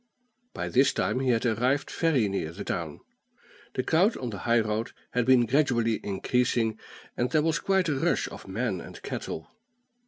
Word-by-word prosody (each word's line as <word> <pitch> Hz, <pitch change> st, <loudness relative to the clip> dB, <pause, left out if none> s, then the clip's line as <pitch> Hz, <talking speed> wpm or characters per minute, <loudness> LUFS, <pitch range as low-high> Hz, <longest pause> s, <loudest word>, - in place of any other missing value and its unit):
By -, -, -3 dB
this 135 Hz, +2 st, +3 dB
time -, -, 0 dB
he 130 Hz, -1 st, 0 dB
had 115 Hz, 0 st, +2 dB
arrived 125 Hz, +5 st, +1 dB
very 145 Hz, -10 st, +2 dB
near 95 Hz, -5 st, -2 dB
the 95 Hz, +4 st, -7 dB
town. 80 Hz, -4 st, -4 dB, 0.7 s
The 130 Hz, -, 0 dB
crowd 180 Hz, -, +3 dB
on 125 Hz, -3 st, -4 dB
the 100 Hz, -, -6 dB
high 115 Hz, 0 st, +5 dB
road 110 Hz, +1 st, -2 dB, 0.2 s
had 125 Hz, -1 st, 0 dB
been 130 Hz, -2 st, +6 dB
gradually 120 Hz, -3 st, +2 dB
increasing, 110 Hz, +2 st, 0 dB, 0.4 s
and 120 Hz, +1 st, 0 dB
there 155 Hz, -2 st, +2 dB
was 160 Hz, 0 st, +1 dB
quite 190 Hz, -2 st, +1 dB
a 155 Hz, -, +1 dB
rush -, -, +1 dB
of -, -, -11 dB
men 95 Hz, -1 st, -2 dB
and -, -, -10 dB
cattle. 80 Hz, 0 st, -5 dB
120 Hz, 180 wpm, -27 LUFS, 110-135 Hz, 0.7 s, been